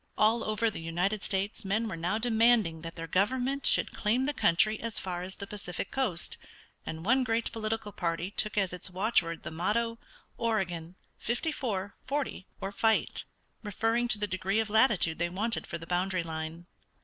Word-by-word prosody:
All 225 +2 +4
over 215 +1 +1
the 165 - -6
United 180 +6 -1
States 195 +3 -1
men 215 +4 0
were 190 - -3
now 175 +5 0
demanding 225 -7 +3
that 165 0 -7
their 165 - -4
government 255 - +1
should - - +2
claim 235 +5 +1
the 290 - +1
country 215 0 +3
as 230 -1 -2
far 180 -2 -2
as 185 +1 -6
the 200 - -6
Pacific 195 -4 -5
coast, 210 -11 0 0.5
and 160 +1 -5
one 260 +4 +4
great 230 -1 0
political 220 -1 -2
party 170 0 -2
took 215 0 0
as 195 -3 +2
its 180 - -3
watchword 180 -3 +1
the - - -5
motto, 230 +8 0 0.4
"Oregon, 180 -7 -1 0.2
fifty 240 +8 -1
four, 205 -9 -2
forty, 280 -9 -2
or 195 - -3
fight," 220 +2 +1 0.4
referring 225 +3 +1
to 225 - +1
the 210 - 0
degree 190 +1 0
of 220 -1 -1
latitude 215 -8 +4
they 170 +1 +1
wanted 215 +6 0
for 170 - -4
the 165 - -9
boundary 180 +1 0
line. 160 +1 -5
205 Hz, 180 wpm, -30 LUFS, 175-225 Hz, 0.5 s, All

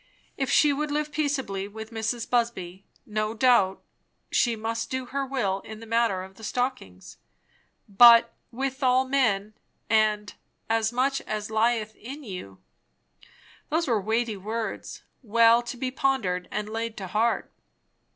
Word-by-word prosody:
If 270 -2 -2
she 295 -2 +4
would 300 +2 -2
live 300 +1 -2
peaceably 270 -10 -2
with 220 +2 -9
Mrs. 225 +1 -3
Busby, 200 -6 -2 0.2
no 215 +1 -2
doubt 230 -6 +3 0.5
she 235 -2 +2
must 225 +1 -3
do 260 0 -3
her 275 +2 -3
will 240 -8 -1
in 220 +2 -10
the 230 - -10
matter 230 -5 +1
of 190 0 -13
the 220 - -13
stockings. 215 - -4 0.7
But 230 +3 +7 0.2
"with 265 +2 -4
all 255 0 +3
men," 220 -7 +1 0.4
and 215 -1 +2 0.3
"as 225 0 +1
much 270 +3 0
as 215 0 -4
lieth 220 -1 +1
in 275 +6 -9
you"; 180 - -8 1.1
those 320 +1 0
were 225 -5 +1
weighty 220 +1 -1
words, 220 +3 -5 0.2
well 230 0 +5
to 240 +1 -7
be 255 0 -2
pondered 225 -10 0
and 210 0 -3
laid 225 +1 -4
to 195 - -5
heart. 220 +6 0
230 Hz, 145 wpm, -26 LUFS, 210-255 Hz, 1.1 s, But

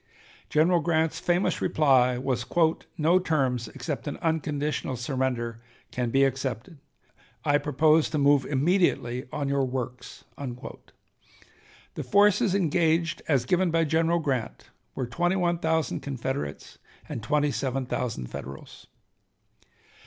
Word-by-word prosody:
General 170 +3 +3
Grant's 160 -1 0
famous 175 +2 0
reply 130 -5 +3
was: 125 -1 -1 0.5
"No 165 +3 +4
terms 130 -9 0
except 130 +4 -5
an 145 - -4
unconditional 150 -4 -1
surrender 120 -2 -2 0.3
can 125 -1 -2
be 135 +3 +3
accepted. 135 - -2 0.7
I 145 -1 +3
propose 155 +2 +3
to 155 - -2
move 140 -1 +4
immediately 140 -4 +1
on 145 -2 -2
your 140 0 +1
works." 125 -1 -5 0.2
The 125 -3 -11
forces 200 -1 +3
engaged 165 -2 +1
as 135 -5 +2
given 180 +4 +2
by 165 0 +2
General 165 +2 +2
Grant 135 -8 -3 0.2
were 130 - -2
twenty 175 +9 0
one 175 -2 +1
thousand 160 -1 0
Confederates 130 - -5 0.3
and 115 - -5
twenty 145 +6 +1
seven 135 -1 -2
thousand 115 - -3
Federals. 70 +1 -9
145 Hz, 120 wpm, -26 LUFS, 125-165 Hz, 0.7 s, No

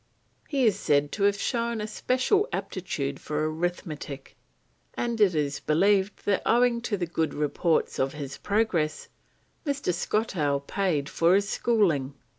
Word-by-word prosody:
He 275 -4 +1
is 215 - +3
said 145 0 +2
to 200 - -2
have 200 0 +3
shown 235 -1 -1
a 210 - -2
special 255 - +1
aptitude 140 -7 -3
for 155 +1 -2
arithmetic, 155 -4 -4 0.6
and 235 -2 -2
it 190 -5 +5
is 145 -1 -1
believed 195 +5 +2
that 200 -2 +2
owing 240 0 +3
to 205 - 0
the 180 - -1
good 160 -1 -2
reports 150 +3 0
of 135 0 0
his 140 -2 -7
progress, 200 -8 0 0.5
Mr. 280 - -1
Skottowe 165 -8 0
paid 170 -8 0
for 170 +4 +3
his 200 0 +2
schooling. 170 - +1
180 Hz, 145 wpm, -27 LUFS, 150-220 Hz, 0.6 s, it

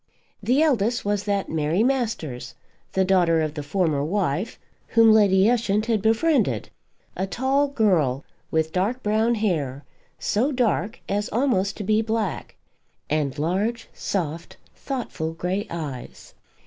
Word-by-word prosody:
The 250 +9 +3
eldest 240 -6 +1
was 205 0 0
that 200 -2 0
Mary 160 +5 +1
Masters, 225 - -2 0.4
the 190 0 +2
daughter 175 -3 +3
of 155 -2 -1
the 150 - -4
former 150 -1 0
wife, 185 +3 -1 0.3
whom 225 -1 +6
Lady 200 -2 +5
Ushant 220 -3 +1
had 225 -3 +1
befriended, 220 - +1 0.4
a 190 +2 -2
tall 265 +8 +1
girl, 180 - +1 0.3
with 160 0 0
dark 215 +8 -1
brown 220 +3 +2
hair, 150 - -1 0.3
so 245 +8 0
dark 235 -4 0
as 205 +1 -1
almost 205 -6 +1
to 210 - -4
be 215 +2 +2
black, 220 -4 -2 0.6
and 150 -2 0
large, 195 +10 -1
soft, 165 -3 -4 0.2
thoughtful 235 - -4
grey 180 +4 -2
eyes. 150 -7 -7
200 Hz, 135 wpm, -24 LUFS, 160-225 Hz, 0.6 s, whom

